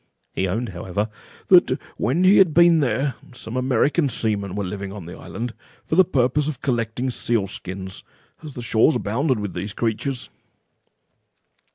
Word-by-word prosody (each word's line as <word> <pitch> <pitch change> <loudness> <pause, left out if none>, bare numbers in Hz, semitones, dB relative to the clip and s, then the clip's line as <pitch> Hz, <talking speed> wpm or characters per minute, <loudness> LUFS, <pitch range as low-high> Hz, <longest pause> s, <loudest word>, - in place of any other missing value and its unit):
He 95 - 0
owned, 115 +6 -2
however, 95 +4 -3 0.4
"that - - +5 0.2
when 135 +11 +1
he 190 +2 +6
had 180 -6 +5
been 170 -1 +6
there, 135 0 0 0.2
some 115 -1 -7
American 135 +5 +2
seamen 100 -6 -1
were 100 - -2
living 100 +1 -5
on 100 -4 -8
the 90 +2 -8
island, 120 0 -6 0.3
for - - -2
the 190 - +7
purpose 140 -3 +1
of 150 -5 -4
collecting 120 0 -1
seals' 110 -5 -1
skins, 95 0 -7 0.4
as 155 -3 -9
the 120 - -5
shores 115 +6 +3
abound 125 +4 0
with 105 -3 -4
these 100 0 -5
creatures." 120 +4 -2
120 Hz, 160 wpm, -22 LUFS, 100-140 Hz, 0.4 s, the